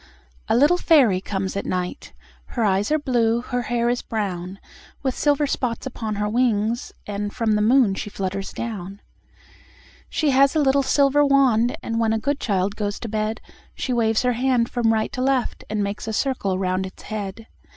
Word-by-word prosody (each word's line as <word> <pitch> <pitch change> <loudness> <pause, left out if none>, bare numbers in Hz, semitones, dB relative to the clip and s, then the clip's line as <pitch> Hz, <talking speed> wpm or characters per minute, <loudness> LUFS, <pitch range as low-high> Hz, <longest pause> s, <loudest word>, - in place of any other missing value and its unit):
A - - +2
little 295 +8 +5
fairy 250 - +4
comes 190 -1 -3
at 200 - -2
night, 180 - -4 0.5
Her 235 - +2
eyes 195 0 +1
are 310 - +4
blue, 240 -5 +1
her 245 0 -2
hair 235 0 -1
is 245 0 0
brown, 190 -4 -4 0.5
With 265 -2 -1
silver 290 0 +2
spots 250 -4 -2
upon 225 -5 -4
her 210 +1 -1
wings, 230 0 0
And 205 0 -3
from 230 -2 -1
the 210 0 +2
moon 235 -1 +4
she 200 - -5
flutters 195 0 -4
down. 200 -4 -6 1.1
She 305 -3 +1
has 275 +3 +4
a - - +3
little 275 -1 +3
silver 280 +1 +3
wand, 260 -4 +3
And 230 0 -2
when 225 -1 +2
a - - +1
good 280 +5 -1
child 195 -1 0
goes 205 -1 -3
to 230 - -5
bed 215 +1 -2 0.3
She 255 - -2
waves 225 -1 +2
her 250 0 +2
wand 250 -3 +2
from 235 -2 +2
right 220 -1 0
to 255 - -4
left, 260 -1 0
And 210 -1 -1
makes 200 +2 -4
a 220 - -2
circle 210 -7 0
round 185 0 -1
its 185 - -14
head. 215 0 -5
225 Hz, 190 wpm, -23 LUFS, 205-255 Hz, 1.1 s, little